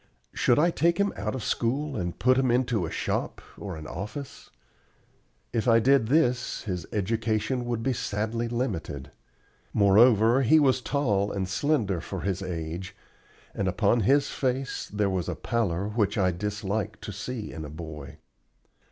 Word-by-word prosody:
Should 120 - +3
I 170 +4 +4
take 170 +1 +2
him 200 0 +1
out - - -3
of 125 - -4
school 135 +5 -1
and 90 -4 -3
put 130 +2 +4
him 130 -1 +2
into 120 -7 +1
a - - -5
shop - - -2 0.2
or 95 -5 -6
an 80 - -8
office? 105 - -7 1.0
If 115 +1 0
I 115 -1 +6
did 135 -1 +4
this 125 -3 +1
his 90 -5 -4
education 110 +4 -1
would 120 -1 -2
be 130 +1 +1
sadly 110 +1 -2
limited. 90 - -3 0.6
Moreover 110 +4 +5
he 145 +5 +5
was 130 -3 +3
tall 105 -9 0
and 95 -1 -2
slender 100 - 0
for 95 +1 -6
his 95 0 -2
age, 85 0 -5 0.6
and 100 - -1
upon 100 +5 +2
his 140 +7 +3
face 130 0 -2
there 105 0 +1
was 95 -4 -1
a - - -2
pallor 100 -5 -1
which 105 -1 0
I 95 -2 +3
dislike 100 +3 -3
to - - -6
see 105 +3 -5
in 80 - -6
a 75 - -7
boy. 75 -3 -8
110 Hz, 160 wpm, -27 LUFS, 95-125 Hz, 1.0 s, I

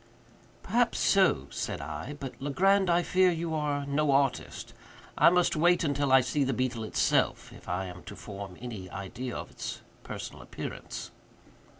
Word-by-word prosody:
"Perhaps 235 +4 +2
so," 190 - +3
said - - -3
I; 145 - -5
"but, 135 -2 -5
Legrand, 190 +7 +3
I 175 +1 +3
fear 185 +1 +4
you 165 -1 -2
are 145 -2 -1
no 145 +1 +1
artist. 135 -1 0 0.4
I - - +7
must 180 0 +3
wait 175 +3 +4
until 145 -2 +1
I 130 0 +8
see 130 +3 0
the 135 0 0
beetle 125 -2 -1
itself, 110 - +1
if - - -12
I 90 +2 -1
am 90 -1 -8
to - - -8
form 100 -3 -8
any 110 -7 -7
idea 100 +7 -5
of - - -6
its - - -6 0.2
personal - - -7
appearance." - - -7
140 Hz, 165 wpm, -29 LUFS, 120-170 Hz, 0.4 s, I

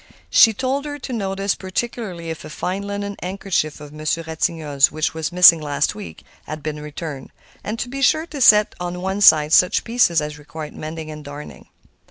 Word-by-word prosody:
She 225 - +7
told 265 +6 -2
her 290 0 -5
to 260 -2 -7
notice 195 -2 -1
particularly 185 -4 -5
if 160 - -8
a - - -9
fine 185 +5 -3
linen 200 0 -5
handkerchief 185 -5 -2
of 150 0 -11
Monsieur 155 +2 -2
Ratignolle's, 160 -3 0
which 155 0 -2
was 160 +1 -3
missing 175 -2 +7
last 145 0 -1
week, 210 -1 -10 0.2
had 155 -1 -7
been 150 0 -4
returned; 150 -2 -7 0.3
and 215 +2 -4
to 240 - -3
be 275 +2 -6
sure 310 +4 +3
to 300 -5 -8
set 210 -3 +6
to 180 0 -4
one 190 +2 -3
side 155 -5 +6
such 180 - +4
pieces 230 -8 +2
as 150 0 -5
required 150 +1 -9
mending 155 0 -7
and 150 0 -9
darning. 145 +1 -10
175 Hz, 190 wpm, -20 LUFS, 155-205 Hz, 0.3 s, She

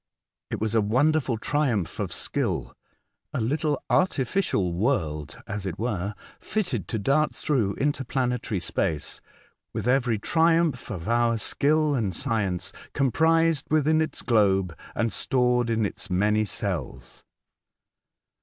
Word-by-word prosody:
It - - -3
was 110 0 -1
a 110 - +4
wonderful 130 +3 +2
triumph 120 - 0
of - - -2
skill - - -2 0.3
— - - -55
a - - 0
little 145 +5 0
artificial 135 - +1
world, 85 - -1
as 100 -1 -4
it 90 0 -4
were, 105 -3 -2 0.2
fitted 125 - -2
to - - -2
dart 140 +8 +1
through 115 -10 0
inter 140 -1 0
planetary 125 -5 -1
space 85 -2 -2 0.5
with - - -3
every 125 -3 +2
triumph 165 +1 +2
of 90 -5 -5
our 115 0 +2
skill 150 +6 +2
and 105 -9 -1
science 100 -5 -1 0.2
comprised 160 +3 +2
within 155 +1 +3
its 160 - -3
globe 95 -7 +2 0.2
and 115 -2 0
stored 125 -2 +2
in 110 -1 +1
its 95 - -5
many 105 +4 +2
cells. - - -4
120 Hz, 130 wpm, -26 LUFS, 100-145 Hz, 0.5 s, a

